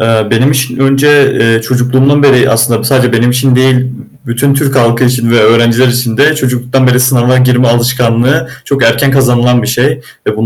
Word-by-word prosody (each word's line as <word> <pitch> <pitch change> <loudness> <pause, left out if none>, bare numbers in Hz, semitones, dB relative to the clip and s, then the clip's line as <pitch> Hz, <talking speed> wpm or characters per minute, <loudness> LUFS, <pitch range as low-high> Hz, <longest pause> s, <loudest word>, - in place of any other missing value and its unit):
Eee, 110 -1 0
benim 120 +4 +1
için 135 -3 -2
önce, 135 +1 +2
eee, 115 0 0
çocukluğumdan 130 +4 0
beri, 135 -3 +3
aslında 115 0 0
sadece 125 -1 0
benim 115 +1 +1
için 125 +1 0
değil, 130 0 +1 0.4
bütün 130 +4 -1
Türk 140 -1 -2
halkı 120 0 +1
için 120 -2 -1
ve 120 -1 +2
öğrenciler 115 +3 +2
için 120 -2 -2
de 155 +3 +2
çocukluktan 125 -1 -2
beri 125 0 +1
sınava 125 0 +1
girme 125 -1 +1
alışkanlığı 125 +2 -1 0.2
çok 135 -3 -2
erken 115 +4 +1
kazanılan 125 -2 +1
bir - - -4
şey. 125 +3 -1 0.3
Ve - - -1
125 Hz, 180 wpm, -9 LUFS, 120-135 Hz, 0.4 s, beri